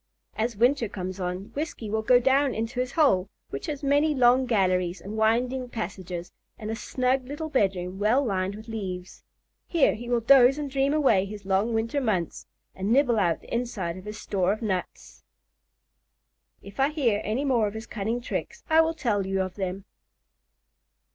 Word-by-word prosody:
As 225 +1 -1
winter 245 0 +2
comes 185 -2 -5
on, 180 +2 -4
Whiskey 300 -6 -4
will 220 +1 -1
go 245 +3 +5
down 270 +2 +2
into 225 +3 -3
his 250 0 -2
hole, 200 - +3 0.2
which 135 - -5
has 290 -1 -4
many 290 +2 +3
long 255 0 +4
galleries 185 -5 +1
and 200 +5 -7
winding 245 +4 +1
passages, 185 -5 -5 0.3
and 215 0 -5
a - - -2
snug 255 +2 -1
little 295 +3 -5
bedroom 190 -7 0
well 235 +7 +3
lined 195 -2 -1
with 220 +2 -11
leaves. 190 -5 -6 0.5
Here 335 -5 +3
he 240 +2 -7
will 240 -1 +2
doze 260 +3 +6
and 290 -2 -4
dream 275 +1 +1
away 265 -11 +3
his 205 0 -9
long 200 +4 +1
winter 230 +6 0
months, 190 -9 -2 0.3
and 195 +3 -3
nibble 245 -3 +4
out 170 -5 +1
the - - -11
inside 220 -8 -2
of 185 +1 -10
his 210 0 -7
store 190 -2 0
of 215 +3 -3
nuts. 190 -4 -4 1.4
If 200 - -12
I 270 +1 +4
hear 250 -9 +1
any 240 +7 -1
more 240 -6 +2
of 205 - -6
his 220 +1 -6
cunning 225 +3 -3
tricks, 240 - -5
I 320 +1 +7
will 325 0 0
tell 205 - 0
you 195 0 -1
of 185 -1 -3
them. 190 0 -4
225 Hz, 180 wpm, -26 LUFS, 195-260 Hz, 1.4 s, I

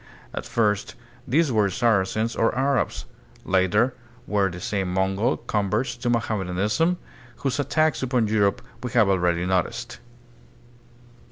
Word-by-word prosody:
At - - -5
first 105 -3 0 0.3
these 150 +2 +2
were 105 -3 +3
Saracens 110 +1 +1
or 115 - +1
Arabs; 135 +1 0 0.4
later 95 +6 +2 0.3
they - - -8
were 100 -2 +3
the 90 0 -8
same 95 0 -2
Mongol 95 +6 +1
converts 105 +5 -1
to 120 - -2
Mohammedanism, 105 - 0 0.4
whose 135 +1 -2
attacks 155 +2 +1
upon 125 -3 +1
Europe 105 +3 +1 0.2
we 125 - -3
have 115 -4 +5
already 90 -2 +1
noticed. 90 -1 -1
105 Hz, 125 wpm, -24 LUFS, 95-125 Hz, 0.4 s, have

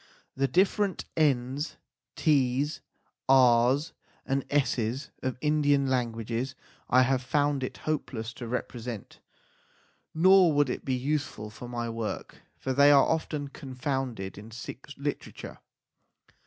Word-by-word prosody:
The 135 +1 +1
different 190 - +1
n 135 -4 +2
s, 150 - -4 0.4
s, 140 0 +2 0.5
r 125 -1 +6
s, 155 +3 -6 0.3
and 135 0 0
s 140 -3 +1
s 120 +6 -3
of 130 -1 -2
Indian 145 -2 +3
languages 120 0 -2 0.3
I 130 +1 +6
have 130 0 +1
found 145 +2 +1
it 130 - -4
hopeless 125 -7 -3
to 120 0 -7
represent, 120 -2 -5 1.0
nor 185 0 +6
would 145 -3 +3
it - - -5
be 130 - 0
useful 130 -5 -2
for 120 +3 -9
my 120 -1 -3
work, 115 -1 -5 0.2
for 130 - -2
they 140 +2 +6
are 140 -1 +7
often 150 -3 -2
confounded 130 -8 -4
in 105 +2 -11
Sikh 120 +3 -9
literature. 145 +1 -5
130 Hz, 130 wpm, -28 LUFS, 120-145 Hz, 1.0 s, are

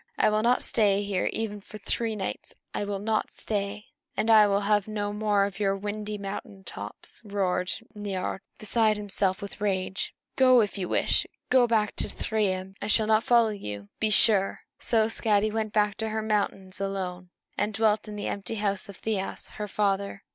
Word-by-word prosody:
I - - +4
will 215 0 +2
not 240 +3 +2
stay 205 -3 +2
here 200 -2 0
even 210 -2 -3
for 215 - -11
three 225 +1 -1
nights! 195 -3 -5 0.2
I - - -1
will 200 -1 -2
not 215 +2 0
stay!" 205 0 -3 0.3
"And 225 - +2
I 215 -1 +8
will 200 0 +2
have 205 0 +2
no 205 -1 -2
more 210 -1 +2
of 200 -1 -6
your 195 -1 +1
windy 210 +1 -4
mountain 195 0 -7
tops," - - -7
roared 190 -3 -1 0.2
Niörd, 195 -2 -3 0.2
beside 215 0 +2
himself 200 -1 0
with 200 +1 -9
rage. 190 -1 -1 0.2
"Go, 255 -1 +6
if 205 - -1
you 185 -3 -3
wish! - - +2 0.2
Go 250 -2 +6
back 215 -2 +1
to - - +3
Thrymheim! 190 -4 -1
I 205 - -3
shall 215 0 +3
not 220 +1 +3
follow 235 -2 +5
you, 105 - -6
be 220 - +1
sure!" 205 -2 +5 0.2
So 220 -2 +2
Skadi 215 -2 +1
went 220 -1 -2
back 210 -2 +1
to 220 -1 -1
her 220 0 -2
mountains 200 -3 -1
alone, 185 -2 -3 0.3
and 210 +1 0
dwelt 215 0 +1
in 210 - -6
the 205 - -4
empty 200 +2 -3
house 200 -1 -1
of 200 - -9
Thiasse, 205 -3 -3
her 210 -1 -3
father. 200 0 -1
205 Hz, 185 wpm, -27 LUFS, 195-215 Hz, 0.3 s, I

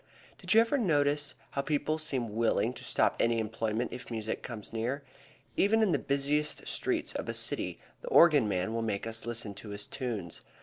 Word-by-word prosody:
Did - - +1
you 225 - +9
ever 250 +5 +1
notice 145 - +1 0.2
how 140 - -1
people 150 +2 0
seem 130 -8 -2
willing 115 0 +2
to - - -10
stop - - +2
any 115 0 +3
employment 110 +1 -2
if 125 - -8
music 110 -2 -3
comes 115 -3 -7
near? 125 +6 -2 0.5
Even 220 +3 +4
in 205 - +3
the 145 - +2
busiest 145 +2 0
streets - - -1
of - - -4
a - - -1
city - - 0 0.2
the - - -10
organ 155 - +6
man 95 +2 -1
will 115 - -1
make 105 -2 -2
us 115 0 -1
listen 115 -3 -1
to 105 - -9
his 100 0 -4
tunes. 110 - -4
120 Hz, 190 wpm, -31 LUFS, 110-150 Hz, 0.5 s, you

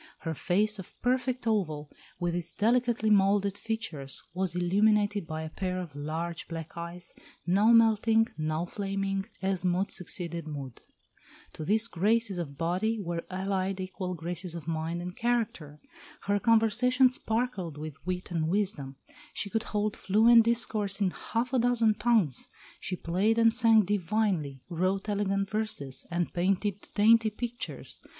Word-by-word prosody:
Her 165 - -3
face 205 +6 +1
of 190 - -11
perfect 255 0 0
oval, 155 -10 -1 0.3
with 175 -1 -1
its 175 -1 -3
delicately 235 0 +2
moulded 200 0 +3
features, 205 -11 -4
was 185 -1 -2
illuminated 205 +1 +2
by 160 -1 -4
a 160 - -5
pair 185 0 -3
of 170 -6 -7
large 160 +4 -4
black 165 -1 -7
eyes, 170 +1 -7 0.3
now 195 +5 +3
melting, 225 0 +4
now 155 +2 -2
flaming, 195 +1 -3 0.2
as 190 -2 0
mood 180 +2 +1
succeeded 170 -2 -2
mood. 140 -5 -7 0.7
To 155 - -6
these 220 +7 +2
graces 210 0 +1
of 140 -5 -6
body 185 +8 0
were 170 -3 -3
allied 190 0 -2
equal 185 -1 -4
graces 170 +1 -4
of 165 -2 -8
mind 165 +1 -2
and 180 +1 -6
character. 215 -11 -2 0.4
Her 205 0 0
conversation 230 +4 +4
sparkled 225 - -2
with 150 -1 -8
wit 180 +1 -4
and 160 -2 0
wisdom; 165 -8 -1 0.4
she 200 - -3
could 225 - 0
hold 210 0 -1
fluent 225 +3 +5
discourse 215 -4 0
in 195 -3 +1
half 235 +7 -3
a 260 - +3
dozen 235 -2 +3
tongues; 210 - +1 0.3
she 185 - -4
played 190 +7 0
and 230 -1 +5
sang 225 -3 +6
divinely, 180 -8 -1
wrote 185 +3 -1
elegant 195 -1 -1
verses, 210 -12 -1
and 175 0 -2
painted 195 +2 -1
dainty 220 +1 +5
pictures. 240 +3 -5
195 Hz, 145 wpm, -29 LUFS, 170-220 Hz, 0.7 s, sang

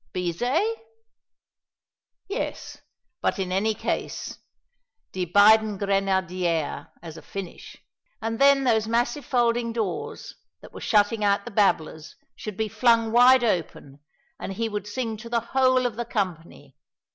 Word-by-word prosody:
Bizet? 245 - 0 1.5
Yes, 405 +6 -5 0.4
but - - 0
in 185 -2 -3
any 210 +4 +1
case - - -4 0.7
"Die 185 -1 -3
beiden 210 +3 +5
Grenadiere" 185 -5 -1 0.2
as 165 -1 -9
a - - -10
finish 195 -3 -9 0.4
and 225 0 -4
then 275 0 +5
those 220 -4 +2
massive 240 +4 -1
folding 235 -2 +1
doors, 220 -6 -4 0.3
that - - -14
were - - -9
shutting 210 0 +2
out 200 0 +1
the 240 - -7
babblers, 165 -6 0 0.2
should 210 -3 -7
be 220 - -1
flung 230 +1 +2
wide 245 +2 +6
open, 160 - -2 0.4
and 195 - -5
he 225 +4 -2
would 210 -2 -5
sing 225 0 -3
to 230 +2 -10
the 235 0 +1
whole 255 -1 +3
of 235 -3 -2
the 240 - -3
company. 175 -7 -5
215 Hz, 135 wpm, -25 LUFS, 190-240 Hz, 1.5 s, wide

